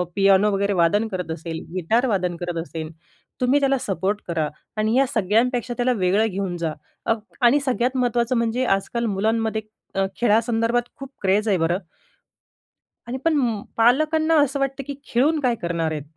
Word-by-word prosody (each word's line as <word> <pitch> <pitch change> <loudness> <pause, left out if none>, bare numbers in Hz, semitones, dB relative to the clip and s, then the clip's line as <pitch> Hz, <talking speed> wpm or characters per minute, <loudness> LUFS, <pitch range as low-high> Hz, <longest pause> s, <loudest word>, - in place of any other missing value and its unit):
Piano 195 +1 +4
वगैरे 200 +1 +1
वादन 195 +5 +2
करत 180 -5 -4
असेल, 160 0 -5 0.2
गिटार 220 +8 +1
वादन 185 -6 0
करत 175 0 -4
असेल, 160 -1 -6 0.5
तुम्ही 255 +3 +3
त्याला 275 -1 +2
सपोर्ट 200 -2 -2
करा 165 -3 0 0.3
आणि 215 +3 +1
या 270 - +5
सगळ्यांपेक्षा 235 +4 +1
त्याला 250 +1 +2
वेगळं 200 0 +2
घेऊन 190 -3 -3
जा 165 -2 -2 0.3
अग 225 0 +1 0.2
आणि 245 +4 +5
सगळ्यात 255 0 0
महत्त्वाचं 245 0 +1
म्हणजे 235 +2 0
आजकाल 235 +4 -3
मुलांमध्ये 220 +2 0 0.3
अ, 195 0 +2 0.2
खेळासंदर्भात 230 +1 +2
खूप 275 -1 -8
क्रेझ 200 +3 +2
आहे 200 -3 +3
बरं 170 +1 +1 1.3
आणि 245 +2 -3
पण 255 -10 +1 0.2
पालकांना 310 +7 +3
असं 280 0 0
वाटतं 275 0 -2
की 285 - -4
खेळून 295 +7 +2
काय 250 -4 +1
करणार 170 -2 -1
आहेत? 150 -2 -4
225 Hz, 160 wpm, -23 LUFS, 190-250 Hz, 1.3 s, या